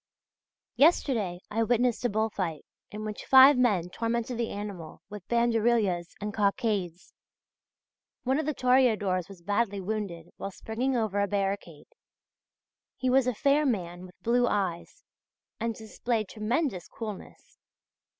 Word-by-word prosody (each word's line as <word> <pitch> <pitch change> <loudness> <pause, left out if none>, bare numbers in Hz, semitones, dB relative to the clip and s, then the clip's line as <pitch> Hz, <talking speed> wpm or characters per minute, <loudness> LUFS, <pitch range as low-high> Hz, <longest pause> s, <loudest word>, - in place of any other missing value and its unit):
Yesterday 230 - +2
I 225 +2 0
witnessed 240 +1 +1
a - - +3
bull 220 +1 0
fight 165 -7 -4 0.2
in 215 +1 -6
which 210 -1 -5
five 265 +2 +9
men 205 -9 +1
tormented 235 +2 -2
the 235 - -1
animal 200 -6 -7
with 210 -3 -9
banderillas 230 -6 +1
and 210 0 -4
cockades. 200 -4 -1 1.1
One 265 +3 +1
of 315 - -2
the 305 - 0
toreadors 220 -8 +2
was 185 -3 -13
badly 205 +1 0
wounded 190 -4 -4
while 195 - -4
springing 235 +7 -2
over 215 -3 0
a 200 - +2
barricade. 195 -6 -3 1.1
He 255 -1 0
was 260 -1 +4
a 250 - 0
fair 280 +6 +3
man 180 - -2
with 180 - -19
blue 245 +1 +3
eyes 185 -6 -2 0.6
and 230 0 -2
displayed 220 -1 -3
tremendous 220 - -2
coolness. 215 -4 -9
215 Hz, 135 wpm, -28 LUFS, 195-240 Hz, 1.1 s, five